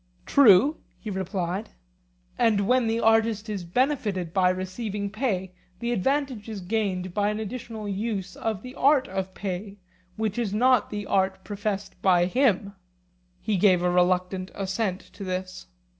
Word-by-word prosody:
True, 275 Hz, +3 st, +6 dB, 0.2 s
he 215 Hz, -, -6 dB
replied. 190 Hz, +1 st, -3 dB, 0.7 s
And 205 Hz, -3 st, +2 dB
when 250 Hz, -1 st, +3 dB
the 225 Hz, +1 st, 0 dB
artist 225 Hz, -1 st, +2 dB
is 200 Hz, -4 st, -3 dB
benefited 200 Hz, -, 0 dB
by 185 Hz, -1 st, +4 dB
receiving 200 Hz, +2 st, -3 dB
pay 200 Hz, -5 st, -2 dB, 0.3 s
the 235 Hz, +4 st, -2 dB
advantage 255 Hz, 0 st, -1 dB
is 210 Hz, -3 st, -5 dB
gained 185 Hz, -2 st, -2 dB
by 205 Hz, +1 st, +1 dB
an 210 Hz, 0 st, -2 dB
additional 220 Hz, -1 st, -6 dB
use 200 Hz, -2 st, -3 dB
of 220 Hz, -3 st, -3 dB
the 255 Hz, 0 st, -8 dB
art 275 Hz, -1 st, +3 dB
of 190 Hz, 0 st, -4 dB
pay, 195 Hz, +1 st, -5 dB, 0.4 s
which 220 Hz, 0 st, -2 dB
is 210 Hz, -4 st, -1 dB
not 250 Hz, +1 st, +3 dB
the 205 Hz, -1 st, -4 dB
art 190 Hz, -1 st, 0 dB
professed 205 Hz, -1 st, -4 dB
by 180 Hz, -2 st, +4 dB
him? 200 Hz, -2 st, +1 dB, 0.7 s
He 210 Hz, -2 st, 0 dB
gave 185 Hz, -2 st, +4 dB
a 180 Hz, -, +2 dB
reluctant 180 Hz, +1 st, +1 dB
assent 195 Hz, 0 st, -2 dB
to 200 Hz, -, -8 dB
this. 185 Hz, -, -5 dB
205 Hz, 150 wpm, -26 LUFS, 185-225 Hz, 0.7 s, True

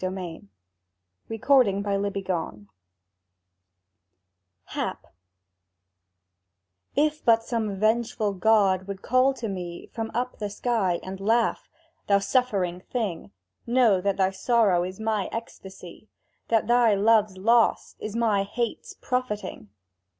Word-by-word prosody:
[Picture: 185 Hz, -3 st, -5 dB, 0.9 s
Sketch 225 Hz, +4 st, -8 dB, 0.2 s
of 200 Hz, +1 st, -2 dB
hour 200 Hz, 0 st, 0 dB
glass] 185 Hz, -, -3 dB, 2.1 s
HAP -, -, -4 dB, 1.9 s
IF 305 Hz, +1 st, +1 dB
but 225 Hz, -1 st, +4 dB
some 225 Hz, -4 st, -2 dB
vengeful 220 Hz, -1 st, +1 dB
god 195 Hz, -1 st, +2 dB
would 200 Hz, -1 st, -7 dB
call 255 Hz, +2 st, +3 dB
to 230 Hz, -, -5 dB
me 180 Hz, -3 st, -6 dB
From 225 Hz, -1 st, -4 dB
up 250 Hz, +1 st, -2 dB
the 210 Hz, -1 st, -3 dB
sky, 200 Hz, -5 st, 0 dB
and 190 Hz, 0 st, -7 dB
laugh: 225 Hz, +3 st, +1 dB, 0.4 s
"Thou 200 Hz, -, +5 dB
suffering 195 Hz, -5 st, 0 dB
thing, 190 Hz, -, -4 dB, 0.4 s
Know 235 Hz, -6 st, +3 dB
that 200 Hz, 0 st, 0 dB
thy 190 Hz, -1 st, +2 dB
sorrow 205 Hz, -4 st, +2 dB
is 185 Hz, +2 st, -6 dB
my 220 Hz, -3 st, -1 dB
ecstasy, 195 Hz, -3 st, -9 dB, 0.4 s
That 225 Hz, -1 st, +2 dB
thy 235 Hz, -2 st, +4 dB
love's 210 Hz, -1 st, +3 dB
loss 230 Hz, +4 st, +2 dB
is 215 Hz, 0 st, -6 dB
my 220 Hz, -4 st, +2 dB
hate's 230 Hz, +4 st, -4 dB
profiting!" 210 Hz, -, -4 dB
210 Hz, 115 wpm, -25 LUFS, 190-230 Hz, 2.1 s, Thou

